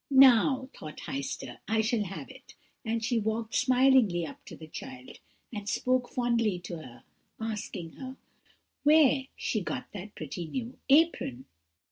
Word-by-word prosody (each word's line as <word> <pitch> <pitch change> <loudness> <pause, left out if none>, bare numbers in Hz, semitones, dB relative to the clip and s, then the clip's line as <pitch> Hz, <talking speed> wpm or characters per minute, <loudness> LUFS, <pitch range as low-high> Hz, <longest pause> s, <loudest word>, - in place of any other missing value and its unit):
"'Now,' 265 -1 +6
thought 155 0 -9
Heister, 135 -2 -5
'I 220 +2 +2
shall 220 -1 +1
have 195 +1 -6
it;' - - -15 0.3
and 225 -1 -1
she 240 -1 +2
walked 220 +1 -2
smilingly 250 -8 +4
up 145 - -10
to - - -9
the 160 - -10
child, 260 +10 -9 0.3
and 205 -1 -4
spoke 255 +1 +1
fondly 235 -5 +1
to 175 -1 -6
her, 125 -7 -12 0.4
asking 210 -6 -4
her, 260 -1 -7 0.6
'where 290 -3 +5
she 215 - -1
got - - -4
that 200 +1 -8
pretty 160 +3 -5
new 245 +7 -4
apron?' 275 - +3
225 Hz, 145 wpm, -29 LUFS, 180-260 Hz, 0.6 s, Now